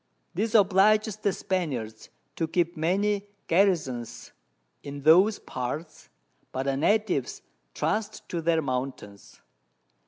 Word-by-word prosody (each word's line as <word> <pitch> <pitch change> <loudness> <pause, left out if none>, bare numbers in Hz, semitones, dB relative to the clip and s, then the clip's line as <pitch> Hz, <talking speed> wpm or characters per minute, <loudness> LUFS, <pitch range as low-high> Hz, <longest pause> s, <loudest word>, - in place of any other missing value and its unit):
This 220 +5 -1
obliges 210 +1 +4
the 205 -2 0
Spaniards 135 - -3 0.3
to 165 - -1
keep 170 +1 0
many 200 +5 0 0.2
Garrisons 165 - 0 0.5
in 140 0 -8
those 185 +8 +6
Parts, 145 +6 -6 0.4
but 130 - -2
the 135 0 0
Natives 185 - 0 0.3
trust 215 0 -2
to 170 - -2
their 165 -1 +1
Mountains. 125 -6 -5
170 Hz, 105 wpm, -27 LUFS, 135-205 Hz, 0.5 s, those